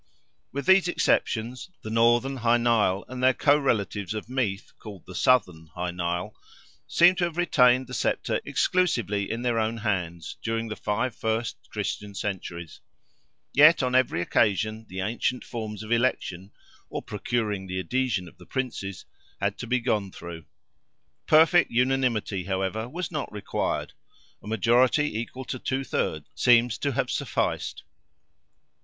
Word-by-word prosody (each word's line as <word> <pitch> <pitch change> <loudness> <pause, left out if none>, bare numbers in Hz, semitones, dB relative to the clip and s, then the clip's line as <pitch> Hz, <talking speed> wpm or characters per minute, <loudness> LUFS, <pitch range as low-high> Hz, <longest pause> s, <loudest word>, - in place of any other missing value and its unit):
With 140 0 -4
these 190 -1 +5
exceptions, 125 -5 0
the 110 - -5
northern 120 +4 +3
Hy 120 -1 +3
Nial, 110 -5 +2
and 130 0 -6
their 130 0 +4
co 145 0 +4
relatives 105 - -1
of 110 - -5
Meath, 120 -6 -2
called 100 -5 -10
the 95 - -10
southern 90 -10 +2
Hy 90 0 -2
Nial, 85 0 -3 0.5
seem 175 +2 +6
to 180 - +2
have 170 -1 -5
retained 130 -7 +4
the 125 - -10
sceptre - - 0
exclusively 115 - 0
in 115 +2 -3
their 120 -2 +1
own 110 +1 -1
hands, 90 -7 -3
during 115 0 -2
the 110 - -4
five 115 +4 -1
first 110 +1 -1
Christian 100 -1 -4
centuries. 85 -5 -5 0.7
Yet 150 +1 +7
on 125 0 0
every 130 -8 +2
occasion, 110 +3 +1
the 95 +1 -4
ancient 115 +5 -1
forms 110 -3 -6
of 110 - -9
election, 105 -6 0 0.4
(or - - -5
procuring 105 -2 -2
the 95 0 -4
adhesion 125 -3 -1
of - - -16
the - - -15
Princes), 115 -8 -4 0.3
had 100 0 0
to 125 - -5
be 125 +2 +2
gone 105 -5 -1
through. 85 -3 -9 0.8
Perfect 165 +3 +5
unanimity, 120 -6 0
however, 95 +4 -2
was 175 +4 -4
not 150 -4 -4
required; 105 -1 -3 0.5
a - - -12
majority 120 +4 +2
equal 130 +3 -6
to 130 - -5
two 135 +2 -2
thirds - - -2
seems 120 -3 +4
to 140 -1 -1
have 130 0 -1
sufficed. - - -2
115 Hz, 150 wpm, -26 LUFS, 100-130 Hz, 0.8 s, Yet